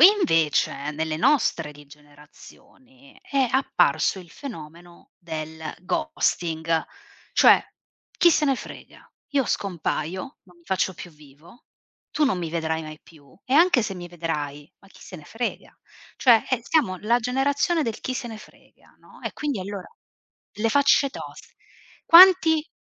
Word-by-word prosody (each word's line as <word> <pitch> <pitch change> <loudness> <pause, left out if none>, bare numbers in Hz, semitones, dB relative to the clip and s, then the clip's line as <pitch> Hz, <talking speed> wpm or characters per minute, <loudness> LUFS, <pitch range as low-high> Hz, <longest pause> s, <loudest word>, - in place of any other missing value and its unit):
E 340 - +11
invece 165 - +1
nelle 155 +1 -3
nostre 170 - +1
di 145 0 -15
generazioni 155 - -19
è 275 -2 0
apparso 185 - +1
il 175 -3 -13
fenomeno 170 - -11
del 160 -2 -7 0.2
ghosting. 165 - -1 0.5
Cioè: - - +6 0.5
“Chi 345 - +5
se 305 -2 +2
ne 275 - +2
frega, - - -12 0.3
io 275 -2 +2
scompaio, 185 - -3
non 180 -2 -22
mi 170 - -26
faccio 190 0 -1
più 175 - -10
vivo, 150 - -19 0.4
tu 300 - +1
non 260 -10 0
mi 170 -2 -4
vedrai 160 -1 -2
mai 155 -1 -9
più 145 -5 -20
e 255 - -6
anche 320 -3 +5
se 210 - -4
mi 175 -1 -9
vedrai, 150 -4 -5
ma 195 - -21
chi - - -19
se 185 - -10
ne 155 - -13
frega”. 230 +8 -6 0.4
Cioè, 235 -4 +5
eh 255 -3 0
siamo 285 -13 +1
la 235 +3 +2
generazione 280 +7 0
del 230 -5 -4
chi 255 - -4
se 255 -1 -5
ne 220 -1 -8
frega, - - -20
no, - - -19
e - - -5
quindi 285 -9 -3
allora 195 0 -7 0.7
le 225 +2 -1
facce 280 -1 +3
tos - - -11 0.5
Quanti 335 -3 +7
190 Hz, 155 wpm, -24 LUFS, -, 0.7 s, E